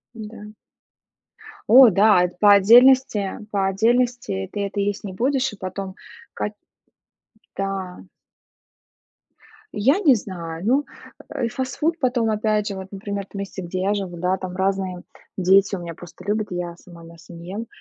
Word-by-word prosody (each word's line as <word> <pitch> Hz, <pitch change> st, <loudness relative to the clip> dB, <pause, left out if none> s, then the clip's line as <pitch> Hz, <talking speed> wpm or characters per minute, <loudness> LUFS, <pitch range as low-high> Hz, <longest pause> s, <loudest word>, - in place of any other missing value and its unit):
Да. 210 Hz, -1 st, -10 dB, 1.2 s
О 250 Hz, +2 st, +9 dB
да, 200 Hz, -1 st, +4 dB
это 180 Hz, 0 st, -3 dB
по 205 Hz, 0 st, +7 dB
отдельности, 230 Hz, 0 st, +5 dB
по 195 Hz, -2 st, 0 dB
отдельности 230 Hz, -, 0 dB
ты 200 Hz, -1 st, -2 dB
это 200 Hz, +1 st, -5 dB
есть 205 Hz, +1 st, -2 dB
не 195 Hz, -, -6 dB
будешь, 265 Hz, +5 st, 0 dB
а -, -, -9 dB
потом 190 Hz, 0 st, -6 dB, 0.4 s
как 210 Hz, -, -4 dB, 1.0 s
да. 195 Hz, -2 st, -4 dB, 1.7 s
Я 270 Hz, -, +2 dB
не 295 Hz, -11 st, +5 dB
знаю. 170 Hz, -4 st, -6 dB
Ну, 275 Hz, +5 st, +2 dB, 0.5 s
э, 240 Hz, -, -1 dB
фастфуд 265 Hz, +7 st, -2 dB
потом 245 Hz, -5 st, +1 dB
опять 215 Hz, -1 st, 0 dB
же 200 Hz, -, -4 dB
вот, 190 Hz, 0 st, -7 dB
например, 200 Hz, 0 st, -5 dB
в -, -, -38 dB
том 200 Hz, -, -8 dB
месте, 195 Hz, -1 st, -6 dB
где 185 Hz, +1 st, -4 dB
я 200 Hz, +2 st, +1 dB
живу, 190 Hz, -4 st, -4 dB
да, 180 Hz, +2 st, 0 dB
там 185 Hz, -1 st, -7 dB
разные, 190 Hz, -1 st, -1 dB
м, 175 Hz, -, -13 dB, 0.3 s
дети 195 Hz, +2 st, +3 dB
у -, -, -6 dB
меня 170 Hz, -1 st, -7 dB
просто 175 Hz, +1 st, -13 dB
любят, 210 Hz, +1 st, -1 dB
я 175 Hz, -1 st, -4 dB
сама 175 Hz, -2 st, -15 dB
мясо 165 Hz, +1 st, -14 dB
не 170 Hz, +1 st, -10 dB
ем, 220 Hz, +4 st, -5 dB
200 Hz, 160 wpm, -22 LUFS, 185-225 Hz, 1.7 s, О